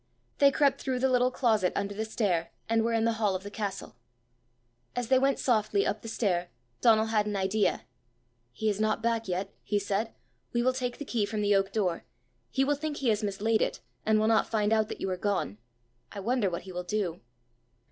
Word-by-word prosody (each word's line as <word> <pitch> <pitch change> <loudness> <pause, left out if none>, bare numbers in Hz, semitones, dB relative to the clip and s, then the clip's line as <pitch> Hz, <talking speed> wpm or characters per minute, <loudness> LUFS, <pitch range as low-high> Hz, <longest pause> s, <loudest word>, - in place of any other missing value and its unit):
They 280 - +7
crept 275 -1 +2
through 260 -2 -1
the 265 +1 +2
little 250 0 +4
closet 220 -8 +2
under 200 0 -1
the 215 +2 -3
stair, 185 -7 0 0.2
and 225 0 +2
were 230 - +1
in 225 0 +2
the 230 - +3
hall 200 -3 +2
of 185 - -4
the 205 - -7
castle. 200 - -5 1.0
As 245 -1 -2
they 260 -1 +5
went 270 0 +2
softly 215 -4 +2
up 210 - -1
the - - -8
stair, 180 -6 0 0.3
Donal 220 -2 +5
had 210 -1 +2
an 210 - -2
idea. 195 - +1 0.7
"He 215 - -3
is 205 -1 +1
not 215 +1 +1
back 230 -1 0
yet!" 190 +2 -3
he 210 - -1
said: 205 +2 -1 0.4
"we 240 0 +2
will 255 +1 +3
take 250 -1 -3
the 290 - -6
key 225 -6 0
from 210 0 -2
the 205 0 +3
oak 195 0 +1
door; 185 -6 0 0.5
he 265 - +1
will 285 +2 +2
think 295 0 -3
he 260 - 0
has 215 0 +2
mislaid 210 +2 +1
it, - - 0 0.2
and 215 0 +3
will 215 - +2
not 225 -1 +3
find 215 -1 +1
out 220 -1 +2
that - - -6
you - - -1
are 185 - -2
gone. 185 - -1 0.5
I 200 - -7
wonder 230 0 +1
what 170 - -4
he 190 - -9
will 180 0 -3
do!" 180 -3 -2
215 Hz, 220 wpm, -29 LUFS, 200-235 Hz, 1.0 s, They